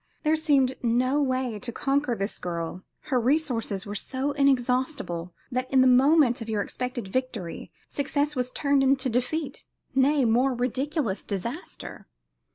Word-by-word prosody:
There 310 0 +3
seemed 285 -5 +3
no 255 +4 +2
way 255 -5 -1
to 240 +3 -4
conquer 275 0 0
this 200 0 -3
girl; 170 0 -4 0.3
her 255 - +4
resources 245 -7 0
were 205 - -5
so 260 +7 -2
inexhaustible 255 - 0 0.2
that 255 +1 -2
in 265 -1 +5
the - - +5
moment 260 0 +5
of 225 - -6
your 210 -2 0
expected 250 -4 -4
victory 235 -7 -4 0.2
success 285 +1 -1
was 250 -1 0
turned 280 0 +2
into 265 -1 +2
defeat; 255 +6 -2 0.3
nay, 270 +1 +3
more, 250 +3 +3
ridiculous 255 - -1
disaster. 235 - -6
255 Hz, 145 wpm, -26 LUFS, 235-280 Hz, 0.3 s, in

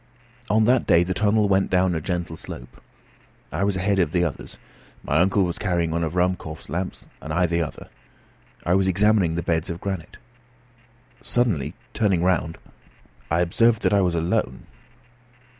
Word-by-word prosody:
On 110 +1 +3
that 125 +2 +3
day 85 - +5
the 95 +1 -2
tunnel 105 +2 +2
went 95 0 +2
down 90 0 +2
a 80 - -2
gentle 85 -1 -3
slope. - - -10 0.7
I - - -1
was 100 -1 +1
ahead 100 +1 +1
of 85 -4 +1
the 90 -1 +2
others. 80 -5 -5 0.5
My 75 - +1
uncle 95 +3 +3
was 85 -2 -3
carrying 85 -4 0
one 85 +1 -1
of 80 +2 -3
Ruhmkorff's 90 -3 -2
lamps 90 +2 -4 0.2
and 75 - -7
I 90 +3 +2
the 85 0 0
other. 80 - -6 0.8
I 85 - +2
was 95 0 +3
examining 100 -3 +3
the 85 - -2
beds 85 +2 -1
of 85 0 -4
granite. 95 -5 -5 1.0
Suddenly 115 - 0 0.2
turning 100 -6 +1
round 90 -2 0 0.7
I 85 +2 +2
observed 110 +6 +2
that - - +2
I 100 - +4
was 90 -2 +1
alone. 80 -6 -1
90 Hz, 170 wpm, -23 LUFS, 85-100 Hz, 1.0 s, day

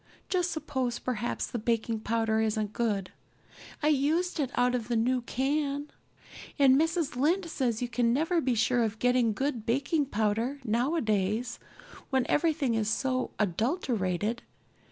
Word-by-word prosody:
Just 360 -2 +1
suppose 265 -7 -2
perhaps 240 -1 -2
the 240 - -4
baking 225 0 0
powder 220 0 0
isn't 215 -1 -1
good? 205 -5 -1 0.7
I 300 - +4
used 315 +5 +1
it 275 -4 0
out 245 0 +2
of 235 -3 -2
the 240 - 0
new 250 +3 +2
can. 280 +3 -1 0.7
And 270 -3 +6
Mrs. 325 -1 +1
Lynde 335 +8 +1
says 245 -3 -1
you - - -1
can 235 0 +1
never 325 +6 +1
be 255 -3 +1
sure 240 +2 +2
of 220 -1 -1
getting 245 -1 +3
good 255 0 -2
baking 275 +6 0
powder 225 +4 0
nowadays 230 - 0 0.5
when 265 -3 +1
everything 295 -5 +1
is 220 -1 0
so 255 +2 0
adulterated. 215 - -1
245 Hz, 145 wpm, -29 LUFS, 225-285 Hz, 0.7 s, And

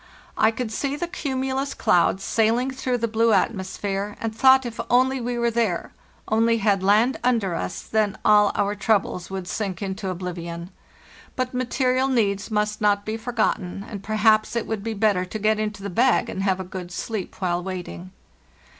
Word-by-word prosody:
I 220 - +4
could 225 0 -4
see 275 +5 -2
the 340 +4 -3
cumulus 270 -4 -2
clouds 180 +2 +2
sailing 230 +4 +1
through 255 -1 -1
the 230 -1 -1
blue 225 0 +2
atmosphere, 200 0 -1
and 225 -1 -3
thought 265 +2 +6
if 235 -1 -6
only 260 +1 +3
we 240 +1 -2
were 235 0 +1
there, 225 -7 -1 0.3
only 230 +1 +3
had 200 -3 +2
land 210 +6 +3
under 230 -7 +1
us, 175 - -4
then 215 -2 0
all 210 -1 +6
our 200 0 +1
troubles 205 -4 0
would 190 -2 -5
sink 190 -2 -3
into 195 0 -4
oblivion. 170 -1 -5 0.6
But 255 0 -2
material 255 +1 +1
needs 210 -6 0
must 210 -1 -1
not 205 -1 +2
be 215 - -2
forgotten, 220 -5 -2
and, 205 -3 -7
perhaps, 215 +1 +2
it 235 - -1
would 220 -3 -4
be 225 0 -3
better 200 -3 +2
to 185 +4 -5
get 215 0 +1
into 210 -2 -3
the 200 - -3
bag 245 +8 +2
and 190 - -4
have 190 -1 +1
a - - -3
good 180 -1 -7
sleep 205 +1 -4
while 175 -2 0
waiting. 175 - -6
215 Hz, 180 wpm, -23 LUFS, 195-235 Hz, 0.6 s, thought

